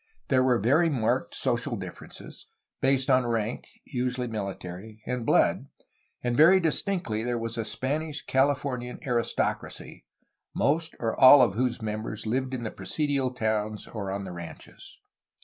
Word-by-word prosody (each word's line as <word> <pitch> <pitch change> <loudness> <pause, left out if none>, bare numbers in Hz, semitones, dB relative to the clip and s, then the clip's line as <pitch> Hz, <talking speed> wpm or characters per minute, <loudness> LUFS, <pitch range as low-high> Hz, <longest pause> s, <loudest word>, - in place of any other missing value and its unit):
There 130 -2 +4
were 125 -2 +3
very 145 - +3
marked 120 -7 0
social - - -1
differences, - - -10 0.3
based 135 -1 +2
on 130 -2 +4
rank 115 -1 -2 0.2
(usually 125 0 -2
military) 105 -1 -6
and 125 -2 -3
blood, - - +3 0.6
and 120 -1 0
very 170 +7 +7
distinctly 165 - -1
there 120 0 -1
was 115 0 -4
a 115 - -2
Spanish 145 +6 -3
CaUfornian 130 -2 0
aristocracy, 120 -3 -2 0.5
most, 160 +3 +1
or 115 -1 -1
all, 130 +1 +10
of 115 - +2
whose 120 0 -1
members 110 0 -4
Uved 130 +4 -1
in 120 - -5
the 110 - -3
presidial 140 -4 -1
towns 110 -3 -2
or 100 -4 -5
on 100 +1 -3
the 95 - -7
ranches. 85 -2 -10
125 Hz, 145 wpm, -27 LUFS, 110-135 Hz, 0.6 s, all